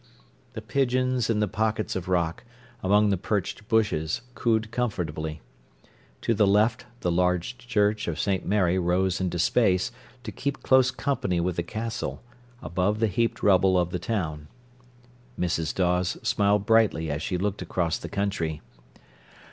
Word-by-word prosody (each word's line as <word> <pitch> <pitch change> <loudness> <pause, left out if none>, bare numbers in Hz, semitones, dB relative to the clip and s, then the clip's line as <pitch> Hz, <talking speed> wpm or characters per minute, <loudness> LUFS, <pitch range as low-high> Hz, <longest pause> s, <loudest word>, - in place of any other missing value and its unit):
The 110 -2 -7
pigeons 130 0 +1
in 105 -2 +1
the 105 - +2
pockets 110 +1 -1
of 95 -1 -4
rock, 85 0 0 0.4
among 105 +2 +3
the 95 - +1
perched 105 +2 -3
bushes, 100 -7 +1
cooed 110 -2 0
comfortably. 80 - -3 0.8
To 115 - +1
the 105 -2 +3
left 105 +3 +2 0.2
the 90 - 0
large 90 +5 +1
church 105 -3 0
of 80 -2 -3
St. 95 -2 0
Mary 95 -2 +2
rose 90 +1 +1
into 90 -1 -1
space, 95 0 +2 0.3
to - - -5
keep 140 -1 -4
close 130 -1 +5
company 130 -9 -1
with 90 0 -1
the 85 - 0
Castle, 110 +6 -4 0.4
above 90 +6 0
the 115 - +3
heaped 115 +3 -1
rubble 95 -2 +4
of 90 -1 +1
the 90 - -2
town. 80 -8 -3 0.9
Mrs. 85 -2 0
Dawes 90 -1 +1
smiled 100 0 +2
brightly 110 -8 +3
as 75 +2 -3
she 90 - -2
looked 100 +2 -2
across 85 -3 -1
the - - -7
country. 90 -6 -2
100 Hz, 150 wpm, -26 LUFS, 90-110 Hz, 0.9 s, close